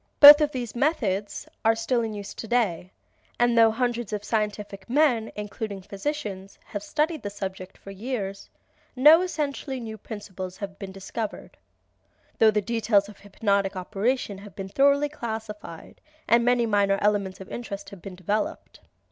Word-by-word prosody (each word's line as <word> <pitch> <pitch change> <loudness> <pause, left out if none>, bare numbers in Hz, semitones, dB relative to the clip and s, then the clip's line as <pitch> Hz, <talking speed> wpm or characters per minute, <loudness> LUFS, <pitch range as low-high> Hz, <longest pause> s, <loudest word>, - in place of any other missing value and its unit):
Both 295 +1 +12
of 300 -1 +2
these 245 -5 -4
methods 230 - -1 0.2
are 225 0 +4
still 235 +2 0
in 220 -2 -3
use, 200 -1 -7 1.1
and 240 0 +3
though 225 -1 +7
hundreds 240 -1 -1
of 210 -1 -3
scientific 210 -2 -3
men, 250 -5 +2
including 210 0 -5
many 190 - -14
physicians, 200 -4 -5
have 205 - -5
studied 305 +7 -1
the 205 - -4
subject 190 -2 -7
for 195 - -11
years, 200 -2 -5 0.5
no 300 +6 +8
essentially 290 -6 -3
new 220 -2 -7
principle 195 -4 -7
has 200 +2 -6
been 195 -2 -6
discovered, 195 +3 -6 0.8
though 220 - +7
the 210 -1 +1
details 215 -3 +2
of 210 - -14
hypnotic 200 -1 0
operation 200 +3 -1
have 205 0 -12
been 195 -1 -6
thoroughly 280 +6 +3
classified 220 - -7 0.3
and 235 0 +5
many 245 0 +3
minor 200 -2 +2
elements 200 -2 0
of 190 - -10
interest 200 -4 -6
have 195 -3 -11
been 190 0 -8
developed. 205 +4 -3
215 Hz, 155 wpm, -26 LUFS, 195-240 Hz, 1.1 s, Both